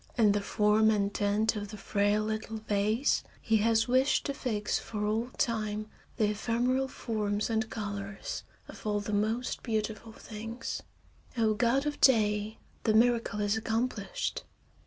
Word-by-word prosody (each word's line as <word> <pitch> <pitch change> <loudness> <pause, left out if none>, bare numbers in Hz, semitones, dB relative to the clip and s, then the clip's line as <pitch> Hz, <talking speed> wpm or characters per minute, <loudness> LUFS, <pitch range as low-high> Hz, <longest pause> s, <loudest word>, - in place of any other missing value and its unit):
In 215 -3 +5
the 205 0 +1
form 210 +1 +3
and 205 -2 +1
tint 210 +2 +1
of 205 -1 -4
the 210 +1 -8
frail 205 +1 +1
little 220 +1 -3
vase 215 +6 +2 0.2
he 225 -1 +2
has 225 +2 +3
wished 260 +3 +3
to 280 - -1
fix 215 -7 -1
for 210 -2 -4
all 220 +3 0
time 215 -2 -1 0.3
the 215 -2 +2
ephemeral 245 +5 0
forms 215 -4 -2
and 220 0 0
colors 200 -2 -5 0.3
of - - -9
all 205 0 +1
the 205 +1 -4
most 220 +4 0
beautiful 220 0 -3
things. 225 +2 -6 0.6
Oh, 220 -2 +3
god 245 +5 +2
of 295 0 -3
day! 215 -3 +3 0.3
The 215 - +3
miracle 230 -2 +3
is 205 +1 +2
accomplished. 230 - -2
220 Hz, 150 wpm, -30 LUFS, 210-230 Hz, 0.6 s, In